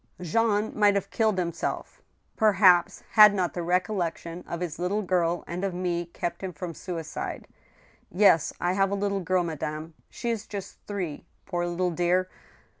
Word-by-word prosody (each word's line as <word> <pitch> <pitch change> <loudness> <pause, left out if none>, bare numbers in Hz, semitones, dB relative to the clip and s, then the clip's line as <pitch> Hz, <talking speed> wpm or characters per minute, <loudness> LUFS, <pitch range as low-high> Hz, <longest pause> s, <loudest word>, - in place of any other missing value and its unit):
" - - -20
Jean 210 +4 +1
might 205 -1 +4
have 200 - -2
killed 220 -3 +1
himself, 170 -2 -3 0.3
perhaps, 195 -5 +4
had 210 -2 +8
not 185 -3 0
the - - -4
recollec 180 0 0
tion 170 +1 -8
of 170 - -4
his 170 -3 -4
little 200 +4 0
girl 175 -2 +1
and 175 +2 -5
of 195 -3 -1
me 175 -1 -2
kept 170 0 -4
him 190 -1 -4
from 170 +1 -6
suicide. 165 -2 -5 0.6
Yes, 180 -4 +4
I 175 +1 +1
have 195 0 +2
a 200 - -1
little 200 0 -1
girl, 185 +1 +1
madame. 155 0 -4 0.2
She 235 - -3
is 225 -2 -4
just 200 -2 -7
three, 180 -6 -4 0.2
poor 175 -2 -2
little 175 +1 0
dear! 180 +2 +1
180 Hz, 175 wpm, -27 LUFS, 170-200 Hz, 0.6 s, had